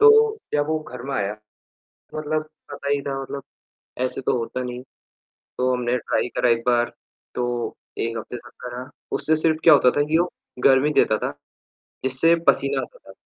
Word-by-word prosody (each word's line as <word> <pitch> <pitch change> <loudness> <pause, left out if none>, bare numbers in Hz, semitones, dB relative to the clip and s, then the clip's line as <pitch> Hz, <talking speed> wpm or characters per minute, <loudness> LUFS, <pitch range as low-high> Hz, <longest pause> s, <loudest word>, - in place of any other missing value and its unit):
तो 440 0 +7 0.2
जब 145 0 +2
वो 155 0 +1
घर - - -7
में 140 - -1
आया, 105 -4 -1 0.6
तो - - -11
मतलब 155 0 -1 0.3
पता 140 0 -5
ही 145 - +2
था 135 -1 -3
मतलब 140 +1 -6 0.6
ऐसे 130 - -2
तो 125 - +1
होता 120 +2 -3
नहीं 125 -1 -4
है। - - -8 0.8
तो 130 0 +2
हमने 125 0 0
ट्राई 125 - 0
करा 125 - +3
एक 115 0 +2
बार। 120 -1 +3 0.4
तो 120 -1 -2 0.2
1 115 0 -1
हफ़्ते 115 +2 -6
तक 120 0 -12
करा, 125 +1 -6 0.2
उससे 160 0 +2
सिर्फ़ 155 0 +2
क्या 160 - +9
होता 125 -3 +6
था 145 - +4
कि 160 +1 +3
वो 175 +1 +2 0.4
गर्मी 135 +2 +6
देता 110 - +2
था, - - -2 0.7
जिससे 130 +6 +4
पसीना - - +3
आता - - -10
था। - - -15
130 Hz, 190 wpm, -23 LUFS, 120-155 Hz, 0.8 s, क्या